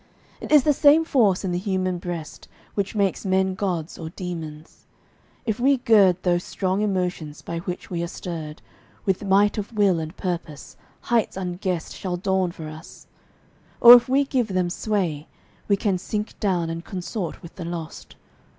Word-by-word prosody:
It -, -, -8 dB
is 300 Hz, -3 st, +7 dB
the 300 Hz, -, +4 dB
same 295 Hz, +3 st, +5 dB
force 215 Hz, -, +2 dB
in 185 Hz, -, -1 dB
the 175 Hz, -, -1 dB
human 185 Hz, -2 st, -1 dB
breast 170 Hz, -3 st, -7 dB, 0.3 s
Which 200 Hz, +2 st, -2 dB
makes 200 Hz, -3 st, 0 dB
men 190 Hz, -1 st, +1 dB
gods 180 Hz, -5 st, -3 dB
or 160 Hz, -1 st, -5 dB
demons. 160 Hz, -3 st, -8 dB, 0.6 s
If 220 Hz, -1 st, -1 dB
we 270 Hz, +2 st, +4 dB
gird 200 Hz, -7 st, +4 dB
Those 175 Hz, -1 st, +1 dB
strong 190 Hz, +1 st, -1 dB
emotions 180 Hz, -7 st, -2 dB
by 170 Hz, -, -4 dB
which 180 Hz, +1 st, -6 dB
we 170 Hz, -1 st, -2 dB
are 170 Hz, -, -2 dB
stirred 160 Hz, -3 st, -7 dB, 0.4 s
With 195 Hz, +1 st, 0 dB
might 200 Hz, +2 st, +3 dB
of 205 Hz, -, -5 dB
will 195 Hz, -5 st, +3 dB
and 160 Hz, +3 st, -6 dB
purpose, 170 Hz, -6 st, -5 dB, 0.3 s
heights 230 Hz, -5 st, 0 dB
unguessed 180 Hz, -2 st, -3 dB
Shall 180 Hz, -2 st, -3 dB
dawn 190 Hz, -1 st, 0 dB
for 160 Hz, -2 st, -8 dB
us; 155 Hz, +1 st, -11 dB, 0.7 s
or 240 Hz, 0 st, +11 dB
if 245 Hz, 0 st, +6 dB
we 275 Hz, +2 st, +4 dB
give 260 Hz, -4 st, 0 dB
them 185 Hz, -3 st, -1 dB
sway 175 Hz, -8 st, -2 dB, 0.4 s
We 200 Hz, -, +3 dB
can 195 Hz, -2 st, 0 dB
sink 210 Hz, +3 st, -4 dB
down 175 Hz, -5 st, 0 dB
and 165 Hz, 0 st, -5 dB
consort 180 Hz, 0 st, -5 dB
with 170 Hz, -, -11 dB
the 175 Hz, -, -5 dB
lost. 165 Hz, -2 st, -7 dB
185 Hz, 170 wpm, -24 LUFS, 170-205 Hz, 0.7 s, or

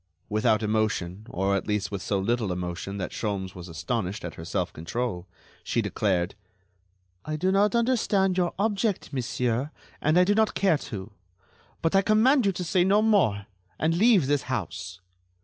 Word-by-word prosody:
Without 110 Hz, +1 st, +2 dB
emotion, 105 Hz, -2 st, -1 dB
or 95 Hz, +2 st, 0 dB
at 100 Hz, -, -2 dB
least 105 Hz, -2 st, -1 dB
with 100 Hz, -2 st, -4 dB
so 100 Hz, -, -1 dB
little 110 Hz, +1 st, 0 dB
emotion 90 Hz, +2 st, -4 dB
that 90 Hz, -3 st, -4 dB
Sholmes 100 Hz, -4 st, -3 dB
was 90 Hz, -1 st, -9 dB
astonished 90 Hz, -, -3 dB
at 85 Hz, -, -5 dB
her 80 Hz, -, -9 dB
self 80 Hz, -, -2 dB
control, 90 Hz, +2 st, -4 dB, 0.4 s
she -, -, -1 dB
declared: 95 Hz, -3 st, 0 dB, 0.9 s
"I 155 Hz, -, -3 dB
do 185 Hz, +5 st, +1 dB
not 205 Hz, +4 st, +3 dB
understand 220 Hz, -6 st, +2 dB
your 180 Hz, -2 st, 0 dB
object, 205 Hz, -3 st, -1 dB
monsieur, 125 Hz, +1 st, -1 dB, 0.3 s
and 155 Hz, +3 st, +3 dB
I 180 Hz, -, +7 dB
do 200 Hz, +3 st, +3 dB
not 220 Hz, 0 st, +2 dB
care 185 Hz, -6 st, +3 dB
to; 100 Hz, -1 st, -6 dB, 0.7 s
but 165 Hz, +3 st, +2 dB
I 195 Hz, -, +6 dB
command 220 Hz, +4 st, +4 dB
you -, -, +3 dB
to 180 Hz, -1 st, -4 dB
say 175 Hz, +1 st, +2 dB
no 200 Hz, +3 st, +4 dB
more 170 Hz, -, +2 dB, 0.3 s
and 160 Hz, +1 st, +1 dB
leave 205 Hz, -, +5 dB
this 145 Hz, +1 st, +1 dB
house." 95 Hz, -5 st, -4 dB
120 Hz, 170 wpm, -26 LUFS, -, 0.9 s, I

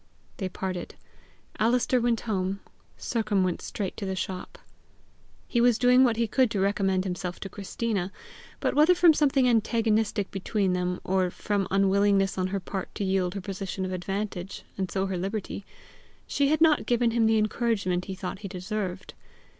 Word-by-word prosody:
They 190 Hz, -2 st, -3 dB
parted. 185 Hz, -1 st, -5 dB, 0.6 s
Alister 245 Hz, +2 st, +2 dB
went 235 Hz, -1 st, +1 dB
home. 195 Hz, -3 st, -2 dB, 0.4 s
Sercombe 215 Hz, -5 st, 0 dB
went 180 Hz, -2 st, -2 dB
straight 195 Hz, -3 st, -4 dB
to 205 Hz, -, -4 dB
the 190 Hz, -, -2 dB
shop. 185 Hz, 0 st, -5 dB, 0.9 s
He 240 Hz, -, +1 dB
was 240 Hz, -2 st, +4 dB
doing 250 Hz, +1 st, +5 dB
what 235 Hz, -3 st, +3 dB
he 230 Hz, -, +2 dB
could 255 Hz, +2 st, +3 dB
to 210 Hz, -, -2 dB
recommend 195 Hz, -1 st, +1 dB
himself 180 Hz, -1 st, -4 dB
to 195 Hz, -, -5 dB
Christina; 200 Hz, -1 st, -3 dB, 0.5 s
but -, -, 0 dB
whether 310 Hz, +5 st, +5 dB
from 345 Hz, -2 st, +6 dB
something 275 Hz, -4 st, +3 dB
antagonistic 225 Hz, -3 st, +1 dB
between 195 Hz, 0 st, 0 dB
them, 180 Hz, 0 st, -1 dB
or 185 Hz, -1 st, +1 dB
from 200 Hz, +2 st, -2 dB
unwillingness 195 Hz, 0 st, +3 dB
on 185 Hz, -, +1 dB
her 195 Hz, +1 st, -2 dB
part 190 Hz, 0 st, -6 dB
to 205 Hz, -, -2 dB
yield 190 Hz, -1 st, 0 dB
her 200 Hz, -, -3 dB
position 190 Hz, 0 st, -4 dB
of 185 Hz, -, -4 dB
advantage 195 Hz, 0 st, -4 dB
and 190 Hz, -2 st, -2 dB
so 190 Hz, +2 st, -1 dB
her 190 Hz, -2 st, -2 dB
liberty, 195 Hz, +1 st, -4 dB, 0.6 s
she 280 Hz, -, +1 dB
had 310 Hz, +2 st, +1 dB
not 315 Hz, -2 st, +4 dB
given 240 Hz, -1 st, +2 dB
him 225 Hz, -1 st, +3 dB
the 220 Hz, 0 st, +4 dB
encouragement 215 Hz, -5 st, 0 dB
he 190 Hz, -, -5 dB
thought 185 Hz, 0 st, -5 dB
he 205 Hz, -, -6 dB
deserved. 190 Hz, 0 st, -4 dB
200 Hz, 170 wpm, -27 LUFS, 185-230 Hz, 0.9 s, from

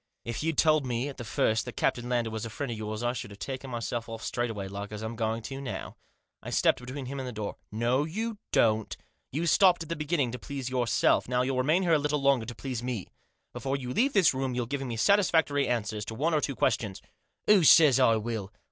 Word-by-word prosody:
If 115 Hz, -, -4 dB
you'd 160 Hz, 0 st, -1 dB
told 155 Hz, -2 st, +4 dB
me 125 Hz, +2 st, -2 dB
at 140 Hz, -, -9 dB
the 120 Hz, -, -6 dB
first 110 Hz, 0 st, +1 dB
that 125 Hz, -, -8 dB
Captain 120 Hz, 0 st, 0 dB
Lander 120 Hz, -2 st, 0 dB
was 110 Hz, -1 st, -4 dB
a 115 Hz, -, -4 dB
friend 135 Hz, +3 st, -4 dB
of 115 Hz, -, -4 dB
yours, 110 Hz, +1 st, -4 dB
I 120 Hz, 0 st, +1 dB
should 110 Hz, -, -6 dB
have 100 Hz, -, -11 dB
taken 130 Hz, +7 st, -6 dB
myself 120 Hz, -1 st, -4 dB
off 115 Hz, -1 st, -7 dB
straightway, 115 Hz, -5 st, -2 dB
like 100 Hz, +2 st, -6 dB
as 105 Hz, 0 st, -6 dB
I'm 110 Hz, +1 st, -4 dB
going 110 Hz, 0 st, -2 dB
to 135 Hz, +3 st, -6 dB
now." 130 Hz, -, -6 dB, 0.5 s
I -, -, -7 dB
stepped -, -, +3 dB
between 130 Hz, +2 st, -6 dB
him 140 Hz, +2 st, -5 dB
and 130 Hz, -, -4 dB
the -, -, -4 dB
door. 105 Hz, -3 st, -5 dB
"No 120 Hz, +5 st, +1 dB
you 215 Hz, +6 st, -4 dB
don't. 110 Hz, -1 st, +2 dB, 0.3 s
You 155 Hz, +6 st, -1 dB
stopped 180 Hz, 0 st, +5 dB
at 165 Hz, -, -13 dB
the 170 Hz, -, -1 dB
beginning 150 Hz, -4 st, 0 dB
to 125 Hz, -, -6 dB
please 135 Hz, -3 st, -5 dB
yourself; 120 Hz, -3 st, +2 dB
now 125 Hz, 0 st, +2 dB
you'll 130 Hz, 0 st, -1 dB
remain 160 Hz, +8 st, +2 dB
a 160 Hz, -2 st, +4 dB
little 150 Hz, +1 st, 0 dB
longer 135 Hz, -4 st, +2 dB
to 120 Hz, -, -6 dB
please 125 Hz, -1 st, -4 dB
me. 120 Hz, -6 st, -4 dB, 0.4 s
Before 135 Hz, 0 st, -2 dB
you 125 Hz, -2 st, -4 dB
leave 270 Hz, -, +2 dB
this 190 Hz, -, +5 dB
room 130 Hz, -1 st, -2 dB
you'll 125 Hz, -1 st, -1 dB
give 140 Hz, +3 st, -3 dB
me 120 Hz, -4 st, -4 dB
satisfactory 160 Hz, -, +3 dB
answers 110 Hz, -3 st, -1 dB
to 110 Hz, -, -6 dB
one 155 Hz, +7 st, 0 dB
or 150 Hz, -, +2 dB
two 140 Hz, -, -2 dB
ques -, -, +2 dB
tions." 100 Hz, -4 st, -7 dB, 0.4 s
"Who 210 Hz, -4 st, +6 dB
says 150 Hz, -3 st, +7 dB
I 115 Hz, -3 st, +5 dB
will?" 110 Hz, -3 st, -3 dB
125 Hz, 240 wpm, -28 LUFS, 115-145 Hz, 0.5 s, says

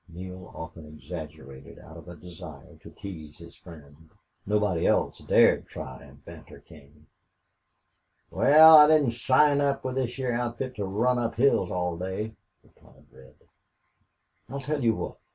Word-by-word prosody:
Neale 90 Hz, +1 st, -10 dB
often 80 Hz, -2 st, -10 dB
exaggerated 70 Hz, -3 st, -11 dB
out 80 Hz, -, -15 dB
of 85 Hz, +1 st, -13 dB
a 90 Hz, -, -10 dB
desire 80 Hz, -3 st, -13 dB
to -, -, -15 dB
tease 80 Hz, -6 st, -11 dB
his 85 Hz, 0 st, -14 dB
friend. 80 Hz, -2 st, -16 dB, 0.4 s
Nobody 105 Hz, -5 st, 0 dB
else -, -, 0 dB
dared -, -, +3 dB
try 65 Hz, 0 st, -9 dB
and 70 Hz, -1 st, -18 dB
banter -, -, -13 dB
King. 75 Hz, +2 st, -19 dB, 1.3 s
"Wal, 155 Hz, +2 st, +7 dB
I 150 Hz, -, +8 dB
didn't 150 Hz, -5 st, +3 dB
sign 140 Hz, +5 st, +2 dB
up 140 Hz, -1 st, -1 dB
with 130 Hz, -, -3 dB
this 125 Hz, -2 st, -2 dB
heah 130 Hz, -2 st, -3 dB
outfit 120 Hz, +2 st, -4 dB
to 100 Hz, -, -3 dB
run 120 Hz, +6 st, 0 dB
up 115 Hz, -1 st, -3 dB
hills 120 Hz, -7 st, +2 dB
all 90 Hz, -1 st, -3 dB
day," 95 Hz, +4 st, -5 dB, 0.3 s
replied -, -, -24 dB
Red. 65 Hz, 0 st, -18 dB, 1.1 s
"I'll 140 Hz, +2 st, -6 dB
tell 145 Hz, 0 st, -3 dB
you 115 Hz, -2 st, +2 dB
what. -, -, -6 dB
95 Hz, 155 wpm, -26 LUFS, 80-125 Hz, 1.3 s, I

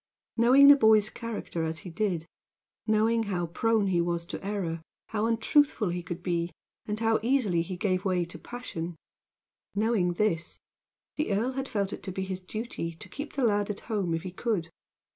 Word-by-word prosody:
Knowing 255 Hz, +4 st, +7 dB
the 285 Hz, -, +11 dB
boy's 220 Hz, -4 st, +5 dB
character 230 Hz, -8 st, -4 dB
as 160 Hz, 0 st, -2 dB
he 180 Hz, -, -6 dB
did 175 Hz, -2 st, -1 dB, 0.6 s
knowing 220 Hz, +1 st, +3 dB
how 185 Hz, -5 st, -1 dB
prone 220 Hz, +5 st, +1 dB
he 180 Hz, -3 st, +2 dB
was 170 Hz, 0 st, -1 dB
to -, -, -7 dB
error, 190 Hz, -5 st, -2 dB, 0.3 s
how 215 Hz, 0 st, 0 dB
untruthful 230 Hz, -, +3 dB
he 175 Hz, +1 st, -2 dB
could 175 Hz, +1 st, -6 dB
be 170 Hz, -1 st, -1 dB, 0.4 s
and 210 Hz, 0 st, -2 dB
how 225 Hz, 0 st, +3 dB
easily 225 Hz, -8 st, +2 dB
he 180 Hz, +2 st, -5 dB
gave 185 Hz, -1 st, 0 dB
way 185 Hz, -3 st, +1 dB
to 170 Hz, -, -10 dB
passion 175 Hz, -9 st, -6 dB, 0.8 s
knowing 205 Hz, -4 st, +2 dB
this, 170 Hz, -4 st, 0 dB, 0.6 s
the 305 Hz, -7 st, 0 dB
earl 220 Hz, +6 st, +1 dB
had 270 Hz, +1 st, -4 dB
felt 200 Hz, -4 st, -1 dB
it -, -, -6 dB
to 190 Hz, -, -5 dB
be 190 Hz, +1 st, -3 dB
his 190 Hz, -1 st, -4 dB
duty 185 Hz, -4 st, -5 dB
to -, -, -10 dB
keep 290 Hz, +2 st, -7 dB
the 275 Hz, -, -1 dB
lad 205 Hz, -3 st, +2 dB
at 205 Hz, -, -4 dB
home 200 Hz, -7 st, -1 dB
if 165 Hz, -, -4 dB
he 185 Hz, -, -5 dB
could. 185 Hz, -4 st, -2 dB
205 Hz, 185 wpm, -28 LUFS, 175-225 Hz, 0.8 s, the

